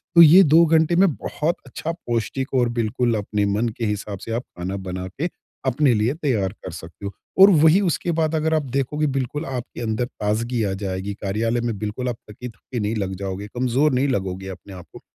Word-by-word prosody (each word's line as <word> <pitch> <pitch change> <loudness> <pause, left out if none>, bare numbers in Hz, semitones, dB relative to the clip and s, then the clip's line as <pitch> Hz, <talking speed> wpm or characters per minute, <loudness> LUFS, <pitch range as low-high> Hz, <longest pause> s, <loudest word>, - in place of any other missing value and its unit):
तो 170 - +10
ये 170 +4 +9
2 165 +1 +6
घंटे 160 +1 +3
में 195 +2 +5
बहुत 165 +3 -2
अच्छा 145 +5 -4
पौष्टिक 130 -4 -3
और 125 -2 +3
बिल्कुल 115 +1 +1
अपने 105 0 -1
मन 105 +4 0
के 115 - -2
हिसाब 105 -1 -3
से 115 - -7
आप 120 - -1 0.2
खाना 90 +3 -3
बना 90 0 -4
के 145 - -3 0.4
अपने 130 +1 +3
लिए 110 +4 +1
तैयार 125 - 0
कर 95 - -5
सकते 85 +3 -10
हो। 100 - -4 0.3
और 195 - +11
वही 160 +4 +6
उसके 175 -2 0
बाद 160 -1 0
अगर 160 +1 +1
आप 155 -1 +2
देखोगे 150 +3 0
बिल्कुल 135 +4 -2
आपके 125 -2 -6
अंदर 110 +1 -1
ताज़गी 115 +1 -2
आ 95 -2 -1
जाएगी, 95 +1 -3
कार्यालय 110 +4 -1
में 115 -3 -2
बिल्कुल 110 +4 -3
आप 120 - -3
थकी-थकी 120 +2 -7
नहीं 105 +1 -1
लग 95 -2 -2
जाओगे, 100 +1 -4
कमज़ोर 130 +6 +1
नहीं 130 +3 +2
लगोगे 95 -6 -2
अपने 95 +1 -10
आप 90 -2 -10
को। - - -11
120 Hz, 205 wpm, -22 LUFS, 100-150 Hz, 0.4 s, और